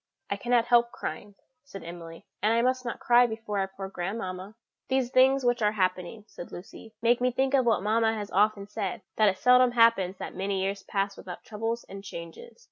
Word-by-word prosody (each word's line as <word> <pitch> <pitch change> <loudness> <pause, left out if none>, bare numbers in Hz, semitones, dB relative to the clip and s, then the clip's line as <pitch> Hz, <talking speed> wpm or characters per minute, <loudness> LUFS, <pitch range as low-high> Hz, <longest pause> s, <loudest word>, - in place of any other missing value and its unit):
"I - - +1
cannot 240 +3 +1
help 240 0 +3
crying," 200 +6 -7 0.3
said 195 -10 -10
Emily; 165 -1 -10 0.2
"and 215 - +2
I 230 +1 +2
must 255 0 +1
not 240 - -4
cry 245 0 +5
before 220 -2 -4
our 195 - 0
poor 195 0 -8
grandmamma." 190 +1 -5 0.3
"These 260 -2 0
things 265 +1 +4
which 245 -1 +2
are 210 0 +2
happening," 185 +1 -2
said 175 - -10
Lucy, 215 +4 -11
"make 240 +1 +3
me 250 0 +2
think 265 +2 0
of 260 -3 +3
what 225 -4 +2
mamma 225 +1 +2
has 205 -1 -6
often 205 0 +2
said, 205 0 -4
that 215 -2 +5
it 190 - -3
seldom 250 +2 +5
happens 230 -6 +3
that - - -7
many 195 0 -2
years 195 +1 -2
pass 200 0 -2
without 180 -2 -9
troubles 225 +2 -4
and 195 0 -10
changes. 170 - -10
215 Hz, 205 wpm, -27 LUFS, 195-240 Hz, 0.3 s, cry